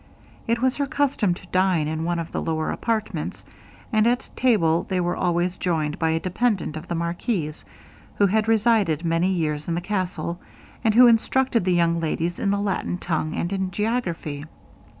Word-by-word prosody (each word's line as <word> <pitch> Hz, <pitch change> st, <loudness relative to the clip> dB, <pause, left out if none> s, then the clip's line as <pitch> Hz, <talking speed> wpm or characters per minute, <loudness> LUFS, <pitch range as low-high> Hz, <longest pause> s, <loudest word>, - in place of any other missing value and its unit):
It 230 Hz, +1 st, 0 dB
was 260 Hz, 0 st, +2 dB
their 285 Hz, -1 st, 0 dB
custom 275 Hz, -, +1 dB
to 185 Hz, -, -13 dB
dine 185 Hz, -4 st, +2 dB
in 160 Hz, +1 st, -2 dB
one 175 Hz, +1 st, 0 dB
of 165 Hz, -1 st, -4 dB
the -, -, -2 dB
lower 160 Hz, -1 st, -1 dB
apartments, 225 Hz, -2 st, -3 dB, 0.5 s
and 215 Hz, +1 st, +4 dB
at 245 Hz, +1 st, 0 dB
table 175 Hz, -10 st, +2 dB
they 185 Hz, -1 st, 0 dB
were 175 Hz, 0 st, 0 dB
always 175 Hz, 0 st, 0 dB
joined 155 Hz, -4 st, -1 dB
by 160 Hz, -, +2 dB
a 160 Hz, 0 st, +1 dB
dependant 185 Hz, -3 st, -1 dB
of 155 Hz, -, -7 dB
the 170 Hz, -, -2 dB
marquis's, 170 Hz, -1 st, -2 dB, 0.5 s
who 205 Hz, -, +4 dB
had 215 Hz, +2 st, +2 dB
resided 215 Hz, -8 st, +2 dB
many 165 Hz, +2 st, +2 dB
years 155 Hz, -5 st, -1 dB
in 170 Hz, -, 0 dB
the -, -, 0 dB
castle, 175 Hz, -3 st, -3 dB, 0.4 s
and 220 Hz, -2 st, +2 dB
who 250 Hz, +1 st, +9 dB
instructed 240 Hz, -1 st, +3 dB
the 185 Hz, -, +2 dB
young 170 Hz, -1 st, +2 dB
ladies 165 Hz, +1 st, -2 dB
in 200 Hz, -, 0 dB
the 200 Hz, 0 st, +1 dB
Latin 195 Hz, -3 st, -1 dB
tongue, 160 Hz, -3 st, -2 dB
and 175 Hz, +3 st, -2 dB
in 190 Hz, -1 st, -1 dB
geography. 175 Hz, -8 st, -2 dB
180 Hz, 185 wpm, -24 LUFS, 165-220 Hz, 0.5 s, who